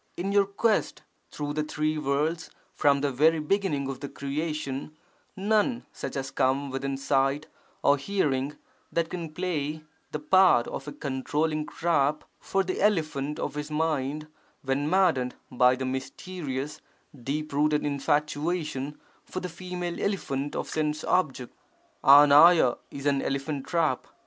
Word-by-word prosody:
In 195 +3 -2
our 200 -1 +5
quest 210 +3 0 0.3
through 145 -1 -4
the 155 0 -1
three 155 0 -1
worlds 150 +4 -1 0.2
from 140 -1 +3
the 145 -1 +1
very 155 +5 +4
beginning 155 -3 0
of 135 -1 -5
their 140 - -6
creation, 150 0 -4 0.4
none 215 +5 +1
such - - -6
has 135 -1 -3
come 135 +1 +1
within 135 +1 -2
sight 135 +2 +1 0.4
or 145 - +5
hearing, 145 -4 -1 0.3
that 165 -1 -1
can 170 -3 -5
play 155 -3 -3 0.3
the - - -2
part 165 -3 +4
of 135 - -6
a - - -4
controlling 150 +3 -2
trap 155 -3 +1 0.2
for 195 0 0
the 185 0 -3
elephant 155 -8 +1
of - - -3
his 150 +1 -5
mind 150 -1 -1 0.4
when 140 +2 0
maddened 165 -9 +2 0.2
by 125 0 +4
the 130 +1 -4
mysterious, 135 +2 -5 0.3
deep 145 +4 -4
rooted 150 +1 +2
infatuation 150 0 -1 0.2
for 185 - -5
the 180 - -5
female 180 0 -5
elephant 145 -8 -2
of - - -3
sense 155 -1 -1
object. 135 -9 0 0.5
[3TRFT 145 0 +7
is 140 0 -8
an 140 -1 +2
elephant 140 0 -3
trap. 165 -7 0
150 Hz, 140 wpm, -27 LUFS, 140-165 Hz, 0.5 s, 3TRFT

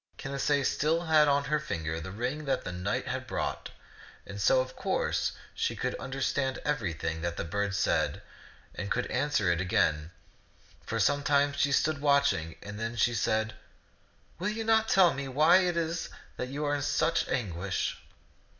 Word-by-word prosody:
Canacee 140 0 0
still 160 +5 +1
had 155 -2 +5
on 140 0 +3
her 150 +1 0
finger 80 - -3
the 95 - -6
ring 125 +9 -3
that 135 - 0
the 90 - -4
knight 90 +3 -2
had - - -3
brought, - - -3 0.6
and 100 0 -7
so 130 - +5
of 130 0 -3
course - - 0 0.2
she - - -1
could - - -2
under 135 +1 -5
stand 130 -1 0
everything 85 - -2
that 85 0 -3
the - - -2
bird 100 +4 -2
said 100 - 0 0.5
and 100 - -5
could 125 - 0
answer 125 -9 +1
it 85 +1 0
again. 80 -6 +1 0.7
For 115 - -3
some 145 +7 +3
time 140 0 +2
she 140 0 +1
stood 145 +1 +1
watching, 140 - +2
then 115 +3 -5
she 120 0 +2
said, 110 -1 0 0.9
"Will 185 +4 0
you 220 +1 -3
not 220 0 +3
tell 185 -3 +5
me 140 0 -4
w^hy 155 +7 +5
it 175 -1 -1
is 165 0 -2 0.3
that 125 - -4
you 145 +3 -3
are 145 - +1
in 145 - -1
such 165 +4 +1
anguish 95 -5 -2
135 Hz, 175 wpm, -29 LUFS, 100-150 Hz, 0.9 s, had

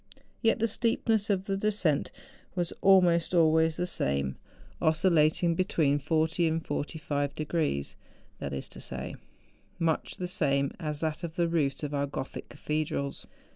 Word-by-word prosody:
Yet 225 - +3
the 230 0 +1
steepness 225 -1 +1
of 190 -2 +1
the 195 - -1
descent 195 -7 +1 0.5
was 175 -2 0
almost 180 -3 +5
always 160 -1 +4
the 180 - 0
same, 70 - -1 0.5
oscil 160 0 +2
THE 190 - +6
JUNGFRAU. 160 -3 +5
81 - - +4
lating 170 +1 0
between 155 -5 +2
40 160 +3 +1
and 160 0 -1
45 145 -1 -2
degrees, 155 - -1 0.4
that 70 - -4
is 70 -1 -4
to - - -10
say. - - -6 0.6
much 165 -2 -1
the 180 - -3
same 140 -7 +1
as 150 -3 -3
that 160 +1 -2
of 165 -1 -5
tlie 170 -1 +1
roofs 145 -3 0
of 150 0 -3
our 140 0 0
Gothic 135 -1 -6
cathedrals. 150 -2 -3
160 Hz, 165 wpm, -29 LUFS, 145-180 Hz, 0.6 s, THE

